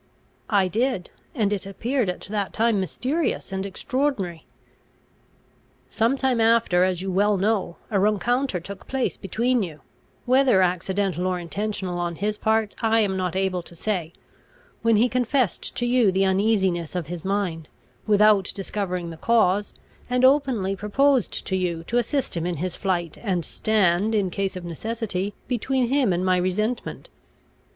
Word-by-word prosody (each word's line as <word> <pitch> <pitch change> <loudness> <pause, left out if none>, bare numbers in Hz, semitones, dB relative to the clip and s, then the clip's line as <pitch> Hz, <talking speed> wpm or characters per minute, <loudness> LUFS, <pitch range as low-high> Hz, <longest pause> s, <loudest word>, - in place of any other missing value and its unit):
"I 200 -4 +3
did, 220 -1 -1 0.2
and 210 -5 +1
it 195 -1 -4
appeared 235 +3 -1
at 180 - -4
that 205 -2 -2
time 225 -2 +2
mysterious 260 - -2
and 190 0 -2
extraordinary." 200 - -2 1.4
"Some 230 +5 +1
time 260 -3 +1
after, 225 -6 +4
as 185 -1 0
you 190 - -2
well 200 +2 +2
know, 195 -3 0 0.2
a 200 - +2
rencounter 215 +2 +1
took 190 +3 -10
place 265 -2 -1
between 235 +5 0
you, 160 -6 -6 0.4
whether 255 -6 +4
accidental 185 0 0
or 185 -1 0
intentional 185 0 -3
on 175 -1 -2
his 210 +4 -2
part 220 -1 +1
I 225 0 +3
am 195 -3 0
not 185 -1 -2
able 190 -1 0
to 170 - -11
say, 175 -3 -2 0.7
when 230 -1 +3
he 225 +4 +4
confessed 250 -3 0
to 240 - -1
you 240 -4 +3
the 190 +1 +2
uneasiness 190 -4 +1
of 175 -3 -2
his 170 +1 -6
mind, 190 -5 -2 0.4
without 210 -2 +4
discovering 185 -3 -3
the 165 - -9
cause, 205 0 +2 0.4
and 250 +1 +3
openly 260 -8 +2
proposed 255 +7 +1
to 190 - -1
you 175 -3 -1
to 235 +8 0
assist 265 +1 -1
him 170 0 -1
in 180 - -2
his 175 +3 -3
flight, 175 -5 -2
and 185 -7 -1
stand, 210 0 +1
in 195 -4 +1
case 195 +1 -2
of 180 -1 -6
necessity, 205 +2 -3
between 250 0 0
him 265 -6 +2
and 180 +1 0
my 185 -1 +3
resentment. 210 +7 -2
200 Hz, 160 wpm, -24 LUFS, 180-230 Hz, 1.4 s, after